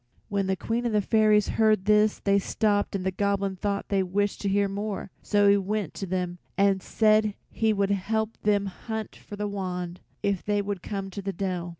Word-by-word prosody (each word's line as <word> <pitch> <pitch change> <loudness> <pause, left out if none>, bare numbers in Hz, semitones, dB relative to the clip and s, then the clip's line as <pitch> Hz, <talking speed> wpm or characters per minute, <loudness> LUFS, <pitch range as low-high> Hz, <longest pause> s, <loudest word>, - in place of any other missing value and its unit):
When 200 -2 0
the 190 - +1
Queen 230 +5 -2
and 225 - -1
the 210 - +4
fairies 215 -2 +4
heard 215 -3 +3
this 210 0 +4
they 200 0 +2
stopped 205 0 0
and 185 -2 -3
the 190 - +1
Goblin 200 0 0
thought 200 +1 -2
they 195 -1 +2
wished 200 +2 -1
to 200 - 0
hear 200 +1 +2
more, 200 0 -4
so 205 -1 +3
he 200 0 +6
went 200 -1 -2
to 195 - -5
them 180 -1 -2 0.2
and 195 -1 +3
said 215 -1 +3 0.2
he 220 -1 +1
would 200 -1 +1
help 220 +3 -1
them 205 -1 +2
hunt 220 +3 -5
for 205 - -10
the 205 0 -2
wand, 180 -3 -4 0.2
if 200 -3 0
they 205 0 +1
would 200 -2 -3
come 195 0 -5
to 200 - -5
the 195 0 -3
dell. 180 -2 -3
200 Hz, 210 wpm, -27 LUFS, 195-210 Hz, 0.2 s, he